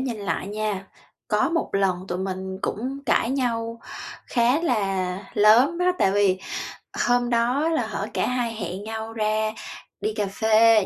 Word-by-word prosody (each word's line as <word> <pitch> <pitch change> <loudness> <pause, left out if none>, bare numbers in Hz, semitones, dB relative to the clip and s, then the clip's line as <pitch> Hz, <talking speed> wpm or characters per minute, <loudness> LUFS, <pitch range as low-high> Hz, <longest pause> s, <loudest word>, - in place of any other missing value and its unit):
nhìn 255 -4 -2
lại 200 -2 -2
nha, 210 -2 -2 0.4
có - - +2
một 335 0 0
lần 195 -2 +2
tụi 180 - -2
mình 190 0 -4
cũng 260 +6 -2
cãi 235 - +2
nhau 230 -3 -1 0.5
khá 245 +5 +3
là 195 - 0 0.2
lớn 240 +11 +5
đó, 360 0 +3
tại 190 - +4
vì 200 -2 +3 0.7
hôm 245 0 +3
đó 245 +7 +2
là, 320 - 0
hở, - - -3
cả - - +1
hai 245 -2 -1
hẹn 190 -2 -5
nhau 220 +1 -5
ra 215 0 0 0.5
đi 215 +1 -1
cà 210 -2 -1
phê 220 +1 +4
220 Hz, 160 wpm, -24 LUFS, 200-245 Hz, 0.7 s, lớn